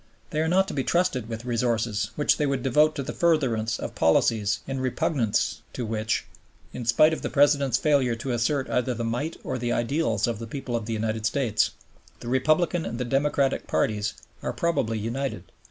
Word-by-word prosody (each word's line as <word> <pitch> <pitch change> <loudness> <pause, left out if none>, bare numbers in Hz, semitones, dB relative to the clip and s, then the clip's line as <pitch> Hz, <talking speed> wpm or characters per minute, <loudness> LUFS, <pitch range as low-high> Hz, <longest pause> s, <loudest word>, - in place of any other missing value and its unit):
They 155 - 0
are 160 - +1
not 190 +3 +3
to - - -5
be 135 - -1
trusted 170 -11 0
with 115 +1 -6
resources 115 -3 0
which 150 - +2
they 150 - +1
would 135 -3 -1
devote 150 +4 +3
to 140 - -3
the 130 - -5
furtherance 125 -10 +1
of - - -5
policies 100 +5 +2
in 135 -1 -3
repugnance 115 -5 0
to 125 - -3
which, 110 0 -1 0.5
in 120 - -5
spite 155 +8 +5
of - - -4
the - - -2
President's 140 -4 +3
failure 135 -5 +2
to 120 +3 -4
assert 130 +4 0
either 125 0 0
the 120 - -3
might 120 +8 -2
or 130 - -3
the 120 0 -1
ideals 120 -3 +1
of 115 -3 -2
the 115 - -6
people 125 0 -4
of 115 -2 -3
the 115 - -2
United 110 0 -1
States, 120 -4 +1 0.5
the - - -9
Republican 155 +6 +2
and 115 +1 -4
the 125 - -1
Democratic 135 +1 +1
parties 105 -1 0 0.3
are - - -3
probably 140 -10 0
united. 115 -2 -4
125 Hz, 195 wpm, -26 LUFS, 115-145 Hz, 0.5 s, spite